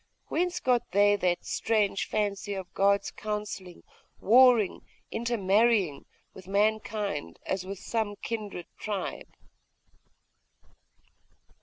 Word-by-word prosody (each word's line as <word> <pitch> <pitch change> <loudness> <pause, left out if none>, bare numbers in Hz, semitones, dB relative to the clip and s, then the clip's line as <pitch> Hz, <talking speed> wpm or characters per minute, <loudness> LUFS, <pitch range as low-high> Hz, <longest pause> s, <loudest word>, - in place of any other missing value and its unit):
Whence 355 +2 0
got 245 -2 +1
they 205 +1 +5
that 180 -2 0
strange 210 -3 0
fancy 205 -1 -2
of 190 -2 -7
gods 200 +1 +2
counselling, 210 -4 -5 0.4
warring, 240 -2 +5 0.3
intermarrying, 215 -7 +1 0.3
with 185 -1 -13
mankind, 205 - -1
as 185 -1 -2
with 195 +1 -5
some 215 0 -2
kindred 210 -6 -4
tribe? 205 -3 -4
205 Hz, 95 wpm, -28 LUFS, 190-220 Hz, 0.4 s, they